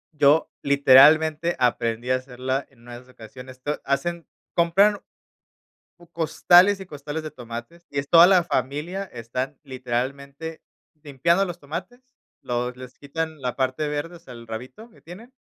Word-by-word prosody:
Yo 150 +2 +3
literalmente 150 +4 +5
aprendí 120 0 0
a 130 - +4
hacerla 130 +1 -3
en 125 -4 -25
una 120 0 -13
de - - -7
esas 125 0 -20
ocasiones, 130 +3 -12
to 150 +1 -3
hacen 165 +5 -2 0.3
compran 195 +5 +3 1.0
u 175 -1 -19
costales 175 +4 +4
y - - -7
costales 150 0 -6
de 155 - -6
tomates, 120 +8 -9
y 140 - -2
es 140 - -6
toda 170 +1 +8
la 185 -3 +5
familia, 170 +6 -2
están 125 0 -5
literalmente 140 +4 -5 0.4
limpiando 170 +6 +1
los 175 -1 -7
tomates, 175 - -7 0.4
los 125 0 -3
les 130 +1 -12
quitan 160 +1 -5
la 125 -1 -3
parte 130 +3 -1
verde, 150 +4 -4
o - - -20
sea, 150 -7 -13
el 115 -1 -11
rabito 125 - -9
que 230 - -22
tienen, 220 +9 -13
140 Hz, 160 wpm, -23 LUFS, 130-170 Hz, 1.0 s, toda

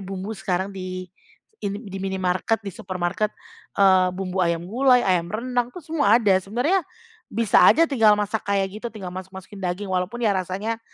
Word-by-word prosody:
bumbu 195 +2 -5
sekarang 190 -1 -2
di 185 -1 -6 0.6
in 200 0 -3
di 195 -3 -8
minimarket, 190 +3 -1
di 195 - -5
supermarket, 185 +1 -2 0.5
eee, 190 -2 +5
bumbu 190 0 -2
ayam 170 -1 0
gulai, 250 +5 +3
ayam 175 -3 +1
rendang 245 +3 -1
itu 250 - -21
semua 290 -9 +3
ada. 215 -5 +3
Sebenarnya 245 - +1 0.5
bisa 225 -1 +3
aja 330 - +6
tinggal 225 -9 +4
masak 210 +1 -2
kayak 200 +1 -1
gitu, 235 - -4
tinggal 195 -6 -8
masuk-masukin 190 +1 -9
daging, 185 +2 -3
walaupun 190 +7 -2
ya 210 - +4
rasanya 195 +5 -3
195 Hz, 165 wpm, -23 LUFS, 185-225 Hz, 0.6 s, aja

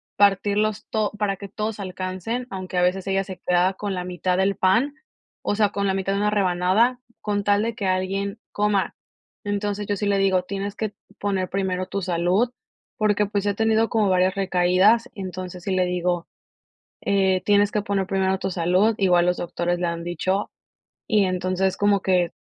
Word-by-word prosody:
partirlos 205 +1 +2
to 215 -2 0
para 200 -2 0
que 200 - -8
todos 215 +2 -4
alcancen, 185 +5 -4
aunque 185 -1 -5
a - - +4
veces 185 +1 0
ella 195 0 +1
se 190 -1 -9
queda 180 +1 +3
con 200 0 -4
la 180 - -3
mitad 180 0 -1
del 195 +1 +2
pan, 230 +11 +2 0.5
o - - -1
sea, 210 -1 +3
con 200 0 -1
la 190 - +1
mitad 195 0 -1
de 200 - 0
una 210 +1 +2
rebanada, 200 +5 +2 0.2
con 205 -1 -1
tal 205 +1 +3
de 230 0 -1
que 200 -3 -3
alguien 195 +2 -1
coma. 205 -2 0 0.5
Entonces, 205 0 -2
yo 205 - 0
sí 205 - -3
le 200 -1 +2
digo: 190 -2 +2
"Tienes 200 +2 -4
que 215 -1 -3 0.3
poner 195 -2 -1
primero 185 -1 -1
tu 200 - -3
salud", 180 +7 +1 0.5
porque, 210 -1 +2
pues, 205 0 -2
si 205 - +2
ha - - +1
tenido 225 +1 +2
como 215 -3 +2
varias 185 +1 +2
recaídas, 190 +5 +3
entonces, 185 -2 -6
sí 195 - -2
le 185 -1 +2
digo: 180 -1 -1 0.7
"Eh, 190 -2 +2
tienes 205 0 +4
que 210 - 0
poner 195 -2 -1
primero 190 0 +1
tu 190 - -2
salud", 185 +5 +2
igual 180 -3 +3
los 180 0 +1
doctores 175 0 -2
le 175 - 0
han 170 0 -3
dicho. 185 +4 -1 0.6
Y 210 -3 +3
entonces, 185 +1 0
como 205 -1 +3
que 180 -3 +2
195 Hz, 190 wpm, -23 LUFS, 185-205 Hz, 0.7 s, a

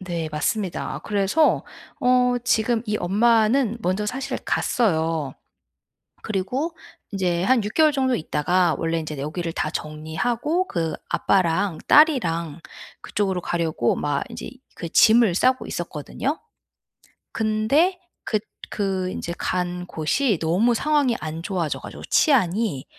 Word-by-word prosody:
네 170 -4 -4
맞습니다. 175 +5 -2
아 - - -4
그래서 205 +10 +2 0.4
어 250 -1 +3
지금 230 -1 +1
이 210 0 0
엄마는 225 +4 +2
먼저 200 +2 -1
사실 265 +3 -3
갔어요. 160 - 0 0.9
그리고 250 - -2 0.4
인제 180 -3 0
한 235 0 +3
6 210 - -5
개월 310 -1 +5
정도 260 -3 +1
있다가 170 +1 +1
원래 165 0 -1
인제 155 -2 -6
여기를 165 +4 -4
다 155 - -1
정리하고 230 - -2
그 165 -3 -2 0.2
아빠랑 180 -1 +1
딸이랑 170 - +3 0.4
그쪽으로 190 -3 -1
가려고 160 -9 0
막 145 -1 -1
인제 - - -7
이 260 - -13 0.2
그 170 - -5
짐을 220 -1 +5
싸고 255 +5 +2
있었거든요? 175 - -4 1.0
근데 225 - +1 0.3
그 215 - 0 0.3
그 190 -3 -1
인제 170 - -5
간 180 -1 -2
곳이 185 - 0
너무 190 +9 +2
상황이 285 -3 +2
안 160 +1 -5
좋아져 175 -5 -2
가지고 - - -10
치안이 210 - +2
195 Hz, 260 characters per minute, -23 LUFS, 165-245 Hz, 1.0 s, 개월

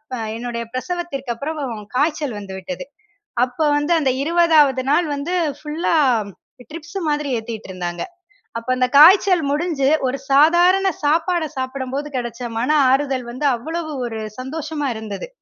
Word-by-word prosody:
அ - - -5 0.2
என்னுடைய 235 0 -4
பிரசவத்திற்கு 275 -3 -4
அப்புறம் 295 +7 -5 0.4
காய்ச்சல் 295 -3 0
வந்து 200 -2 -8
விட்டது. 275 +8 -6 0.6
அப்போ 250 +5 -2
வந்து 295 +4 0
அந்த 275 -4 +1
20வது 310 -5 +4
நாள் 315 +4 +3
வந்து 285 +6 -3 0.2
ஃபுல்லா 305 +3 -2 0.8
ட்ரிப்ஸ் 335 +4 -7
மாரி 295 -2 -1
ஏத்திட்டுருந்தாங்க. 190 -6 -5 0.6
அப்போ 230 +2 -7
அந்த 255 0 +2
காய்ச்சல் 365 +1 +7
முடிஞ்சு, 295 -3 0 0.2
ஒரு 260 +2 -2
சாதாரண 350 +7 +5 0.2
சாப்பாட 325 +3 +2
சாப்புடும்போது 260 +2 -3
கிடைச்ச 240 0 -5 0.2
மன 240 +4 -1 0.2
ஆறுதல் 265 -1 +1
வந்து 255 +4 -4
அவ்வளவு 315 +5 -5
ஒரு 225 -2 -5 0.2
சந்தோஷமா 295 +2 -4
இருந்தது. 220 - -6
285 Hz, 130 wpm, -20 LUFS, 255-320 Hz, 0.8 s, காய்ச்சல்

